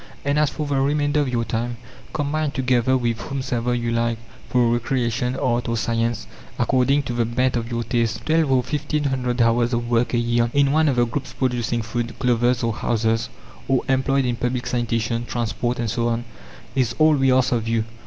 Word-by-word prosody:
And 140 Hz, +1 st, +2 dB
as 150 Hz, -1 st, +3 dB
for 155 Hz, -, -4 dB
the 140 Hz, -2 st, 0 dB
remainder 145 Hz, +1 st, +1 dB
of 145 Hz, -3 st, +1 dB
your 120 Hz, -2 st, -1 dB
time, 120 Hz, +2 st, -3 dB, 0.3 s
combine 155 Hz, 0 st, -1 dB
together 130 Hz, -1 st, +2 dB
with 120 Hz, -2 st, -1 dB
whomsoever 125 Hz, -3 st, -2 dB
you 120 Hz, -1 st, -1 dB
like, 115 Hz, 0 st, 0 dB, 0.3 s
for 125 Hz, -1 st, +3 dB
recreation, 120 Hz, 0 st, 0 dB
art, 120 Hz, -2 st, 0 dB
or 115 Hz, -, 0 dB
science, 115 Hz, 0 st, -1 dB, 0.3 s
according 135 Hz, +2 st, +2 dB
to 120 Hz, -, -4 dB
the 120 Hz, 0 st, +1 dB
bent 125 Hz, +3 st, 0 dB
of 115 Hz, -1 st, -2 dB
your 120 Hz, -1 st, -2 dB
taste. 115 Hz, -1 st, -1 dB
"Twelve 160 Hz, -3 st, +2 dB
or 130 Hz, -1 st, +3 dB
fifteen 150 Hz, +2 st, -2 dB
hundred 125 Hz, -3 st, 0 dB
hours 120 Hz, +1 st, +2 dB
of 120 Hz, 0 st, -1 dB
work 120 Hz, +1 st, +1 dB
a -, -, +3 dB
year, 120 Hz, 0 st, +1 dB
in 140 Hz, -1 st, +4 dB
one 155 Hz, +1 st, +3 dB
of 135 Hz, -, +1 dB
the 120 Hz, -1 st, +3 dB
groups 130 Hz, +2 st, -5 dB
producing 120 Hz, -3 st, -1 dB
food, 120 Hz, +1 st, -4 dB
clothes, 125 Hz, -1 st, +1 dB
or 115 Hz, -1 st, +1 dB
houses, 115 Hz, 0 st, 0 dB, 0.4 s
or 135 Hz, -2 st, +2 dB
employed 135 Hz, 0 st, +2 dB
in 120 Hz, -1 st, -1 dB
public 125 Hz, 0 st, -2 dB
sanitation, 115 Hz, -1 st, -1 dB
transport, 120 Hz, +1 st, -2 dB
and 115 Hz, -3 st, -2 dB
so 115 Hz, 0 st, 0 dB
on, 120 Hz, 0 st, -1 dB, 0.5 s
is 125 Hz, -3 st, 0 dB
all 155 Hz, 0 st, +5 dB
we 135 Hz, -2 st, +3 dB
ask 130 Hz, 0 st, +3 dB
of 115 Hz, -2 st, 0 dB
you. 115 Hz, -1 st, +1 dB
120 Hz, 200 wpm, -22 LUFS, 115-135 Hz, 0.5 s, all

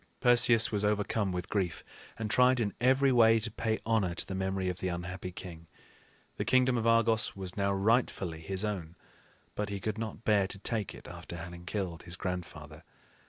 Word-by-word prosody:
Perseus 120 Hz, -2 st, +5 dB
was 105 Hz, -1 st, 0 dB
overcome 105 Hz, -1 st, 0 dB
with 90 Hz, 0 st, -4 dB
grief, 90 Hz, -5 st, -2 dB, 0.3 s
and 110 Hz, -, -3 dB
tried 125 Hz, +3 st, +4 dB
in 105 Hz, -3 st, -1 dB
every 130 Hz, +2 st, +4 dB
way 115 Hz, -2 st, +5 dB
to 115 Hz, +1 st, -4 dB
pay 110 Hz, 0 st, -1 dB
honor 105 Hz, -6 st, +1 dB
to -, -, 0 dB
the -, -, -6 dB
memory 95 Hz, 0 st, -2 dB
of 90 Hz, 0 st, -3 dB
the 95 Hz, -, -2 dB
unhappy 90 Hz, +1 st, -5 dB
king. 85 Hz, -2 st, -10 dB, 0.7 s
The -, -, -1 dB
kingdom 130 Hz, 0 st, +3 dB
of 115 Hz, -1 st, 0 dB
Argos 115 Hz, -1 st, +3 dB
was 95 Hz, -2 st, -6 dB
now 100 Hz, -1 st, +1 dB
rightfully 100 Hz, -5 st, +1 dB
his 95 Hz, +5 st, -3 dB
own, 90 Hz, -6 st, -4 dB, 0.6 s
but 105 Hz, 0 st, -3 dB
he 100 Hz, -1 st, -4 dB
could 110 Hz, +2 st, -3 dB
not 115 Hz, 0 st, -5 dB
bear 105 Hz, -4 st, +3 dB
to 100 Hz, -, -3 dB
take 105 Hz, 0 st, -2 dB
it -, -, -13 dB
after 85 Hz, -, -8 dB
having 85 Hz, +1 st, -9 dB
killed 90 Hz, -5 st, -3 dB
his 85 Hz, 0 st, -8 dB
grandfather. 90 Hz, -2 st, -6 dB
100 Hz, 190 wpm, -30 LUFS, 90-115 Hz, 0.7 s, Perseus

